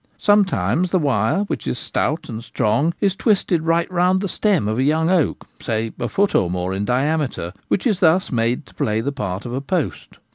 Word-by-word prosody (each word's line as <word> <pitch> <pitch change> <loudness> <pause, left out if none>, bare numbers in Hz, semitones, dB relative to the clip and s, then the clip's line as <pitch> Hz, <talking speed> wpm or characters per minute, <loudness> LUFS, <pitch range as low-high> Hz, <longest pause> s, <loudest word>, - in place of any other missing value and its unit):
Sometimes 195 -3 +2
the 185 - +2
wire, 135 - +1
which 205 - -5
is - - -1
stout 155 +6 -1
and 115 -1 -6
strong, 140 +9 0
is 195 -3 +2
twisted 195 -6 +1
right 165 +1 +1
round 180 +1 +2
the 200 - -2
stem 195 - +1
of 110 +3 -1
a - - +3
young 160 +4 +2
oak, 180 -5 +1 0.2
say 110 -1 -2
a 120 -1 -2
foot 200 0 +1
or 90 - +2
more 90 +1 -2
in 100 +2 -2
diameter, 130 - -1
which 195 - 0
is 210 -7 +1
thus 180 0 +3
made 120 +3 0
to - - -18
play 105 0 -1
the 140 - -2
part 105 -8 -4
of 120 - -5
a 130 - -2
post. 160 +1 -3
150 Hz, 210 wpm, -20 LUFS, 115-185 Hz, 0.2 s, a